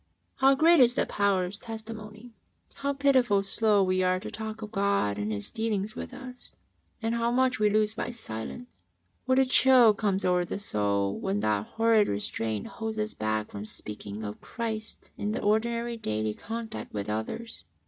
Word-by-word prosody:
" - - -46
How 270 +1 +6
great 330 +3 +5
is 245 -1 +5
the - - +2
power 200 -3 +1
of 195 +3 -6
Testimony 220 0 -8
I - - -28
How 280 0 0
pitifully 260 -8 +3
slow 205 0 +3
we 185 0 +1
are 185 0 +2
to - - -7
talk 220 +1 -6
of 210 - -7
God 200 - +1
and 105 +1 -2
His 100 -1 -3
dealings 215 -1 -2
with - - -6
us, 255 -1 -10 0.5
and 225 +1 0
how 235 0 +1
much 255 0 +2
we 210 -1 +4
lose 215 0 +2
by 225 - -3
silence! 235 - -7 0.4
What 260 0 +2
a 265 - +5
chill 255 -3 +6
comes 200 -2 0
over 180 -1 +3
the 175 - -4
soul 100 - -1
when 100 +2 -1
that 105 -1 -1
liorrid 225 -2 +4
restraint 105 +1 -2
holds 220 -1 -5
us 215 0 -2
back 110 0 -2
from 100 +1 -6
sp>caking 105 0 -7
of 105 - -8
Christ 220 -2 -5
in 210 +1 -1
the - - -2
ordinary 235 +2 +1
daily 110 - -2
contact 225 - -6
with 100 0 -3
others 110 - -4
215 Hz, 185 wpm, -28 LUFS, -, 0.5 s, How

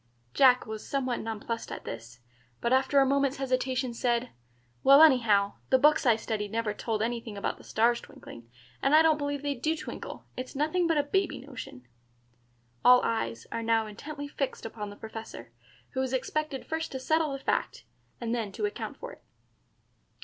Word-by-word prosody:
Jack 255 -2 +5
was 220 -1 -6
somewhat 260 -3 -1
nonplussed 225 +1 -4
at - - -6
this, 115 +1 -8 0.4
but 235 - +1
after 265 +2 +4
a 270 - +5
moment's 275 0 +1
hesitation 255 -1 -1
said, 240 +1 0 0.5
"Well, 275 +1 +8
anyhow, 220 -9 +4 0.2
the 260 - +6
books 300 0 +4
I 235 - +6
studied 215 -2 -3
never 225 -2 -1
told 215 0 -2
anything 230 -2 -3
about 200 - -3
the - - -14
stars 235 +2 +2
twinkling, 115 0 -13 0.3
and 275 +2 +4
I 315 - +7
don't 315 -2 +4
believe 285 -1 -3
they 285 -1 0
do 310 +5 -1
twinkle. - - -7
It's 255 +1 -6
nothing 315 +5 +1
but 325 -2 +2
a 290 - +3
baby 385 +6 0
notion." 250 - -10 1.0
All 250 0 +8
eyes 115 - -2
are 230 - -2
now 225 -1 +2
intently 285 +8 -7
fixed 275 -4 -4
upon 215 -2 -6
the 205 - -10
Professor, 220 - -9 0.4
who 260 - -1
is 265 0 -2
expected 285 +1 -2
first 320 0 -3
to 265 - -3
settle 315 +2 +1
the - - -3
fact, 270 - -2 0.4
and 235 -1 -2
then 225 -4 -2
to 425 - -2
account 410 - -5
for - - -7
it. - - -15
255 Hz, 180 wpm, -29 LUFS, 225-285 Hz, 1.0 s, Well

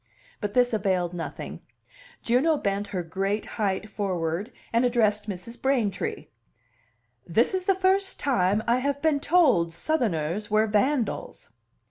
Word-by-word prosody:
But 205 -1 -4
this 245 -1 +3
availed 185 -4 0
nothing; 170 -2 -6 0.6
Juno 275 +7 +3
bent 200 -3 -1
her 180 -3 -3
great 195 +5 -2 0.2
height 200 0 0
forward, 195 0 -2 0.2
and 230 +2 +3
addressed 215 -4 +2
Mrs. 200 +5 -7
Braintree. 235 -9 0 1.0
"This 220 - +2
is 370 -1 -2
the 390 - +4
first 380 +1 +1
time 205 -5 +1
I 235 +1 +3
have 280 +2 -1
been 310 -3 +3
told 280 - +3
Southerners 210 - -1
were 215 +1 +3
vandals." 230 +4 -1
215 Hz, 130 wpm, -26 LUFS, 190-265 Hz, 1.0 s, the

